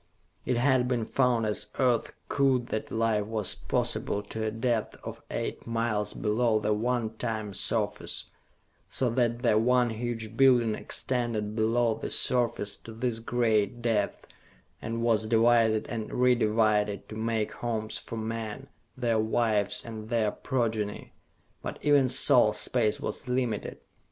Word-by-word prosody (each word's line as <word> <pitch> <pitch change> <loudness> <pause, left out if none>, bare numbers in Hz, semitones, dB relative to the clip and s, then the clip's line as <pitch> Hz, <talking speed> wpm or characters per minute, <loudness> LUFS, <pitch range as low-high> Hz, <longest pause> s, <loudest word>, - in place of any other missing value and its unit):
It 125 - +1
had 130 0 +3
been 120 -3 0
found 125 -3 +1
as 105 -1 0
Earth 125 -4 +2 0.2
cooled 130 -3 +1
that 110 - -3
life 115 -2 +1
was 110 -3 -1
possible 105 - -1
to 110 +2 -5
a - - +1
depth 115 0 -1
of - - -7
eight - - -4
miles 115 -2 -1
below 110 +1 +1
the 105 0 +1
one 115 +1 -1
time 110 -4 -3
surface, - - -2 0.6
so 125 -3 0
that 120 0 0
the 110 -3 +4
one 125 +1 +3
huge 115 -1 -4
building 120 -4 +4
extended 115 -3 -2
below 115 +1 +2
the - - -5
surface 120 -5 +1
to 115 - -11
this 115 0 -2
great 115 -1 0
depth, 110 -4 0 0.6
and 115 +1 -3
was 110 -2 +2
divided 115 -1 +3
and 110 -2 -5
re 125 0 +4
divided 105 -3 +1
to 110 - -7
make 110 -1 -1
homes 110 -2 -3
for 115 - -7
men, 115 +3 -5 0.3
their 120 -3 +1
wives, 110 -2 +1
and 110 -2 -8
their 115 -3 +1
progeny. 110 -5 -2 0.5
But - - -5
even 145 -3 +4
so, - - +5
space 110 -4 +1
was - - -5
limited. 125 -4 -2
115 Hz, 145 wpm, -28 LUFS, 110-120 Hz, 0.6 s, so